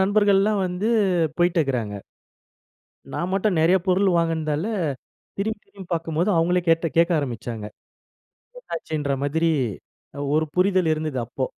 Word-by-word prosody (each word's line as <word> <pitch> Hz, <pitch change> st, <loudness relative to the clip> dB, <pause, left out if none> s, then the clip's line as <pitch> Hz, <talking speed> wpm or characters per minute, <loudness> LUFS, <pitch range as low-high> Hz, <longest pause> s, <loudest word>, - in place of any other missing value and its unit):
நண்பர்கள்லாம் 205 Hz, 0 st, +3 dB
வந்து 180 Hz, +5 st, -2 dB, 0.5 s
போயிட்டு 175 Hz, 0 st, +2 dB
இருக்கிறாங்க. 120 Hz, -8 st, -1 dB, 1.2 s
நான் 180 Hz, +2 st, -2 dB
மட்டும் 195 Hz, -3 st, +1 dB
நிறைய 175 Hz, +4 st, +5 dB
பொருள் 190 Hz, +1 st, +3 dB
வாங்குனதால, 160 Hz, -1 st, 0 dB, 0.7 s
திரும்பி, 220 Hz, +2 st, -1 dB
திரும்பி 195 Hz, -3 st, -13 dB
பார்க்கும்போது 165 Hz, +4 st, -1 dB
அவுங்களே 175 Hz, +2 st, +2 dB
கேட்டு 165 Hz, 0 st, +3 dB
கேட்க 170 Hz, +1 st, +4 dB
ஆரம்பிச்சாங்க. 120 Hz, -4 st, -5 dB, 0.9 s
என்ன -, -, -19 dB
ஆச்சுன்ற 150 Hz, -3 st, -2 dB
மாதிரி 160 Hz, +3 st, +1 dB, 0.7 s
அ -, -, -7 dB, 0.2 s
ஒரு 155 Hz, 0 st, +2 dB
புரிதல் 185 Hz, -2 st, +3 dB
இருந்தது. 155 Hz, -4 st, -3 dB
அப்போ! 130 Hz, +3 st, -3 dB
170 Hz, 125 wpm, -23 LUFS, 155-190 Hz, 1.2 s, நிறைய